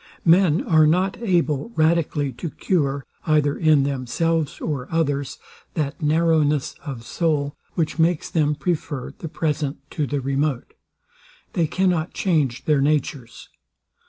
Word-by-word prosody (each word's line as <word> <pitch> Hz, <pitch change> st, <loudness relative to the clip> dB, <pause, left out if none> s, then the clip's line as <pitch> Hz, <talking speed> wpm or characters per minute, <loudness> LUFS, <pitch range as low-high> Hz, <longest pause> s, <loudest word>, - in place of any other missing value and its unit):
Men 170 Hz, -1 st, +4 dB
are 155 Hz, -2 st, +4 dB
not 185 Hz, +5 st, +1 dB
able 175 Hz, -, +1 dB
radically 155 Hz, -3 st, +1 dB
to 170 Hz, -, -6 dB
cure, 140 Hz, -6 st, -1 dB, 0.2 s
either 150 Hz, -2 st, +3 dB
in 155 Hz, -3 st, +4 dB
themselves 140 Hz, +4 st, -1 dB
or 140 Hz, -5 st, -3 dB
others, 145 Hz, -4 st, -1 dB, 0.4 s
that 150 Hz, 0 st, -2 dB
narrowness 155 Hz, -2 st, +2 dB
of 130 Hz, -6 st, -7 dB
soul, 145 Hz, 0 st, -1 dB, 0.2 s
which 165 Hz, 0 st, -1 dB
makes 165 Hz, 0 st, +2 dB
them 150 Hz, -2 st, +1 dB
prefer 150 Hz, -6 st, -3 dB
the 165 Hz, -, -6 dB
present 150 Hz, -3 st, -2 dB
to 150 Hz, -4 st, -1 dB
the 145 Hz, +1 st, -1 dB
remote. 135 Hz, 0 st, -1 dB, 0.8 s
They 165 Hz, -2 st, +1 dB
cannot 180 Hz, -2 st, 0 dB
change 150 Hz, -10 st, 0 dB
their 150 Hz, -3 st, +3 dB
natures. 145 Hz, -4 st, -1 dB
150 Hz, 130 wpm, -22 LUFS, 140-165 Hz, 0.8 s, Men